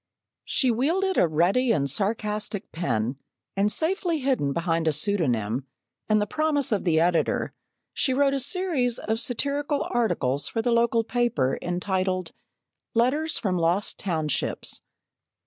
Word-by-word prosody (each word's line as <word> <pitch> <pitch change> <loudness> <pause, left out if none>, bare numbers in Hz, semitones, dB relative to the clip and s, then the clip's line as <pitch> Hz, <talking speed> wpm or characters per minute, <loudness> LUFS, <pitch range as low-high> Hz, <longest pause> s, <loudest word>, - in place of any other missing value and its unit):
She 255 -3 +2
wielded 345 - +1
a - - +5
ready 180 +11 +2
and 145 -10 +2
a - - -1
sarcastic 210 - -2
pen, 130 -6 -1 0.4
and 200 +2 +2
safely 340 - 0
hidden 260 - 0
behind 165 +1 0
a 155 - +3
pseudonym 135 - 0 0.4
and 215 0 +4
the 210 - +1
promise 295 +2 0
of 205 -3 0
the 160 -3 +3
editor, 170 0 +1 0.4
she 270 - 0
wrote 275 +1 +3
a 275 - +1
series 280 -5 0
of 220 +1 -2
satirical 285 +4 -1
articles 145 - 0
for - - -3
the 240 - +1
local 235 0 +3
paper, 230 - 0
entitled: 185 0 -1 0.6
"Letters 290 +7 +2
from 185 -5 -1
Lost 170 +5 0
Townships." 160 -6 -2
210 Hz, 140 wpm, -25 LUFS, 165-260 Hz, 0.6 s, a